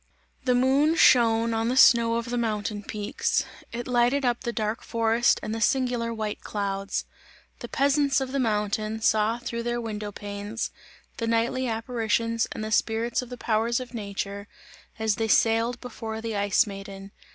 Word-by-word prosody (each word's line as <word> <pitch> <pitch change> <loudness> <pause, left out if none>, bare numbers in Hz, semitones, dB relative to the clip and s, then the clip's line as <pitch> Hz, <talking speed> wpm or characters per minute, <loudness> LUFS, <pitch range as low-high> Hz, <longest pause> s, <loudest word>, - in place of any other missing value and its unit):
The 250 -1 +3
moon 275 +5 +3
shone 230 -5 +5
on 225 0 0
the 255 - 0
snow 235 -3 +6
of 235 +1 -3
the 245 - -1
mountain 210 -2 -2
peaks; 210 0 -1 0.3
it 240 +1 -5
lighted 250 +3 +2
up 240 -1 +1
the 240 - -2
dark 220 -1 -2
forest 230 +1 +2
and 215 - -3
the 225 - -4
singular 245 0 +1
white 215 -2 -4
clouds; 200 -1 -3 0.5
the 240 - -6
peasants 280 +2 +2
of 265 -1 -3
the 275 - -1
mountain, 215 -1 -1
saw 220 +1 +3
through 235 -1 -4
their 240 0 -2
window 210 -3 -5
panes, 205 +2 -5 0.5
the 230 - -2
nightly 230 +3 +1
apparitions 230 0 -1
and 215 - -5
the 215 - -4
spirits 225 +3 +1
of 250 - -9
the 250 - -7
powers 230 +1 0
of 255 0 -8
nature, 200 -2 -5 0.5
as 220 -2 0
they 225 - 0
sailed 230 +2 +2
before 225 -3 -6
the 225 -1 -4
Ice 205 +3 +3
Maiden. 195 -1 -9
230 Hz, 170 wpm, -26 LUFS, 215-240 Hz, 0.5 s, snow